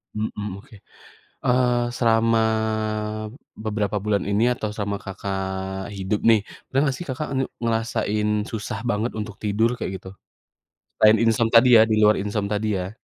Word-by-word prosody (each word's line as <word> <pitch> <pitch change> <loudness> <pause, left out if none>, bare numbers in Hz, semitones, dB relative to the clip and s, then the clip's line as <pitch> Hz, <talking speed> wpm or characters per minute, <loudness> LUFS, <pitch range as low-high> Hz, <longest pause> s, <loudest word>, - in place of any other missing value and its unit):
Mhm, 105 -2 -4
oke, 110 - -17 0.7
eee, 125 -1 +3 0.2
selama 115 -1 +3 1.2
beberapa 105 -1 -2
bulan 100 0 0
ini, 105 +2 +2
atau 110 -3 -4
selama 100 -1 -3
Kakak 95 0 -4
hidup 95 +2 -2
nih. 110 -1 +6 0.3
Pernah 135 - +1
nggak 135 -2 0
sih 175 - -7
Kakak 145 +4 -3
nge 135 - +1 0.2
ngerasain 110 -2 0 0.2
susah 110 -1 -5
banget 110 +2 0
untuk 105 -1 -5
tidur, 110 +2 +1
kayak 115 - -4
gitu? 95 0 -11 0.9
Selain 110 +1 +6
insom 115 0 +3
tadi 120 0 +8
ya, - - +8
di 110 - +1
luar 105 0 +6
insom 105 0 -2
tadi 105 +1 -1
ya. 95 +1 -4
105 Hz, 150 wpm, -23 LUFS, 100-115 Hz, 1.2 s, tadi